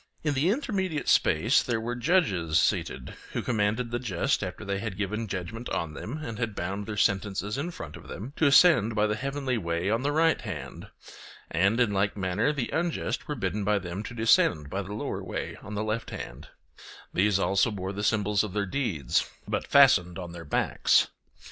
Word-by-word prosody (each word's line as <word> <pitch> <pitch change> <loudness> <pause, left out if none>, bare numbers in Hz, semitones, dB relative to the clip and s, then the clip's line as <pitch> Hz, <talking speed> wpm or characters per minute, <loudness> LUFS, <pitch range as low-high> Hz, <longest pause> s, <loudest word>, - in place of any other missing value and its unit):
In 150 -2 +1
the 145 +6 +2
intermediate 190 - -1
space 110 - +4
there 120 -3 -1
were 120 +2 -3
judges 115 - +2
seated, 65 0 -1 0.2
who - - -2
commanded 115 +1 0
the 120 - -1
just, 115 +2 0
after 95 +3 -6
they 100 0 -2
had 105 -3 -5
given 105 +2 -2
judgment 100 +5 -5
on 80 -2 -2
them 115 - -6
and 115 -8 -6
had 115 -4 -2
bound 100 +3 -4
their 105 -2 -4
sentences 100 0 0
in 140 +6 -2
front 80 - -8
of - - -12
them, 120 +8 -7
to 160 - +4
ascend 140 - +6
by 105 0 +3
the 105 0 0
heavenly 135 0 -2
way 85 +1 -1
on 115 +2 +1
the 145 +2 0
right 160 +2 +3
hand; - - -7 0.6
and 95 +7 +2
in 120 -4 +3
like 100 +1 0
manner 95 +8 +1
the 140 -5 -3
unjust 170 0 -1
were 150 - -2
bidden 105 -3 -2
by 105 +1 +2
them 90 0 -5
to 120 +3 -7
descend 90 -10 +3
by 100 - -1
the 100 +1 -7
lower 110 - -4
way - - -4
on 105 +1 -7
the 105 - -1
left 110 +1 -2
hand; 60 +4 -8 0.7
these 100 +1 +3
also 100 +4 +2
bore 95 -2 -4
the 100 +1 -4
symbols 105 -1 +2
of 105 -4 -5
their 105 -1 0
deeds, 95 - -1 0.2
but - - -2
fastened 100 -11 +5
on 90 -2 -6
their 85 -1 -9
backs. 70 - +2
105 Hz, 200 wpm, -27 LUFS, 95-125 Hz, 0.7 s, ascend